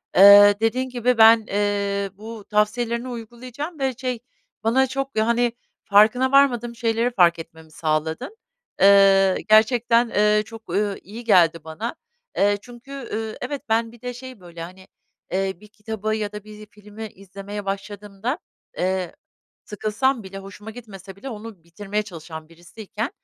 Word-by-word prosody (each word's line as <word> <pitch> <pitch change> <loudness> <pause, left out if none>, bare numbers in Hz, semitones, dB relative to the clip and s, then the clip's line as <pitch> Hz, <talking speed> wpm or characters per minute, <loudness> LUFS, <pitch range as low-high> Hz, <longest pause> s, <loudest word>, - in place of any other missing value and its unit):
Eee, 205 +1 +9
dediğin 250 +4 0
gibi 245 0 0
ben, 225 0 +7
eee, 200 -1 -1
bu 215 +1 -10
tavsiyelerini 235 +3 0
uygulayacağım 250 +7 -8
ve 265 -1 0
şey, 255 -2 -3 0.4
bana 260 +4 +3
çok 270 -1 -4
yani, 235 +2 +2 0.3
farkına 220 +6 +4
varmadığım 240 -4 +3
şeyleri 230 +1 0
fark 175 -6 +3
etmemi 160 -1 -12
sağladın. 160 - -3 0.4
Eee, 195 -1 +6
gerçekten, 230 +2 +4
eee, 210 0 +2
çok, 225 0 -11
ööö, 205 -1 0
iyi 225 +4 -10
geldi 170 -7 +3
bana. 160 - -5 0.4
Eee, 205 +1 +3
çünkü, 245 +3 -14
ııı, 225 -5 -5
evet, 275 +3 -4
ben 225 +1 +1
bir 235 -1 -18
de 250 0 -5
şey, 255 -1 -10
böyle, 170 -2 -11
hani, 185 +3 -10 0.4
eee, 190 +1 -1
bir 210 - -16
kitabı 215 0 -4
ya 210 -2 -3
da 210 -1 -8
bir 215 0 -12
filmi 210 +1 -10
izlemeye 200 +1 -9
başladığımda, 205 - -4 0.4
eee, 185 -1 -2 0.5
sıkılsam 220 +5 -1
bile, 195 0 -9
hoşuma 200 +2 -10
gitmese 195 -5 -11
bile 235 +7 -8
onu 215 -6 -9
bitirmeye 205 +5 -4
çalışan 160 -5 -10
birisiyken 205 - -7
215 Hz, 145 wpm, -22 LUFS, 195-235 Hz, 0.5 s, Eee